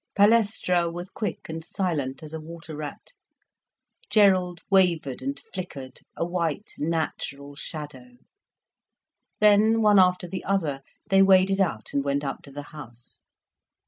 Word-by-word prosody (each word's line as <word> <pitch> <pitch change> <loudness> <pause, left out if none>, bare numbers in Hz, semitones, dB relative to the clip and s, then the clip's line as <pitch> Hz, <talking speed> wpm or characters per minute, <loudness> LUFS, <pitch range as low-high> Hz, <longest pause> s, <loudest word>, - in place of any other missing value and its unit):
Palestra 205 -5 +3
was 175 +3 -7
quick 210 - -4
and 160 0 -6
silent 155 -7 -3
as 155 0 -9
a 160 - -4
water 165 0 -9
rat, 150 -1 -7 1.0
Gerald 185 -5 +3
wavered 175 -9 +2
and 140 +2 -3
flickered, 140 -8 -7 0.2
a - - 0
white 175 +2 -2
natural 145 -3 -3
shadow. 155 - -8 1.2
Then, 215 +2 +5
one 210 -2 +6
after 180 -1 +3
the 185 +1 -5
other, 160 -9 -1 0.3
they 195 0 +5
waded 195 0 +5
out, 115 - -2
and 140 - +1
went 140 +1 -1
up 135 -1 -4
to 140 - -13
the 145 +1 -7
house. 120 -6 -12
170 Hz, 135 wpm, -25 LUFS, 145-195 Hz, 1.2 s, one